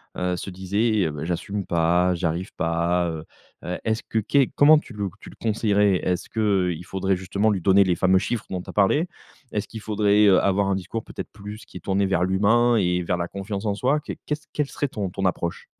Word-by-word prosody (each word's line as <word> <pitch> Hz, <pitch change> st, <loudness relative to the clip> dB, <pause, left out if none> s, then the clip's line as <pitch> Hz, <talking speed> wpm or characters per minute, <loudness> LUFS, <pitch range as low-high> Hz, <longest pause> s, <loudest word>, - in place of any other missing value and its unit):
heu, 90 Hz, 0 st, -1 dB
se 95 Hz, -, -6 dB
disait: 100 Hz, +4 st, 0 dB
«Eh -, -, -2 dB
beh! 75 Hz, +1 st, -5 dB
j'assume 95 Hz, +3 st, -3 dB
pas, 85 Hz, +2 st, +2 dB
j'arrive 85 Hz, +1 st, -2 dB
pas», 85 Hz, +1 st, 0 dB, 0.6 s
heu, 90 Hz, -, -2 dB
est-ce 110 Hz, 0 st, -1 dB
que 110 Hz, -, -1 dB
qu'est 135 Hz, +5 st, +2 dB
comment 150 Hz, +2 st, +7 dB
tu 140 Hz, -5 st, -6 dB
le 100 Hz, -2 st, -3 dB
tu -, -, -12 dB
le -, -, -16 dB
conseillerais? 105 Hz, -3 st, +2 dB
Est-ce 90 Hz, -1 st, -1 dB
qu'il 95 Hz, -6 st, 0 dB
faudrait 95 Hz, 0 st, 0 dB
justement 100 Hz, +4 st, 0 dB
lui 95 Hz, -4 st, 0 dB
donner 100 Hz, +1 st, +5 dB
les 90 Hz, -2 st, +1 dB
fameux 95 Hz, 0 st, +3 dB
chiffres 120 Hz, +1 st, -3 dB
dont 90 Hz, -1 st, -2 dB
tu -, -, -13 dB
as -, -, -7 dB
parlé? 145 Hz, -, +3 dB, 0.4 s
Est-ce 105 Hz, -, -2 dB
qu'il 110 Hz, -, -8 dB
faudrait, 105 Hz, -1 st, +3 dB
heu, 95 Hz, -2 st, +6 dB
avoir 100 Hz, 0 st, +2 dB
un 100 Hz, -, +1 dB
discours 95 Hz, +4 st, -4 dB
peut-être -, -, -8 dB
plus 105 Hz, +1 st, -9 dB
qui -, -, -11 dB
est -, -, -8 dB
tourné 100 Hz, +3 st, 0 dB
vers 95 Hz, -2 st, +1 dB
l'humain 110 Hz, +6 st, +3 dB
et 90 Hz, -4 st, +1 dB
vers 90 Hz, 0 st, -1 dB
la 85 Hz, 0 st, -2 dB
confiance 100 Hz, +2 st, -5 dB
en 105 Hz, -, +1 dB
soi? 135 Hz, +8 st, +1 dB
Qu'est -, -, -7 dB
qu'est 150 Hz, -, 0 dB
ce 150 Hz, -, -20 dB
quelle 150 Hz, -2 st, 0 dB
serait 145 Hz, -, -2 dB
ton 100 Hz, -6 st, -3 dB
ton 95 Hz, +2 st, -4 dB
approche? 85 Hz, -2 st, -2 dB
100 Hz, 230 wpm, -24 LUFS, 90-110 Hz, 0.6 s, comment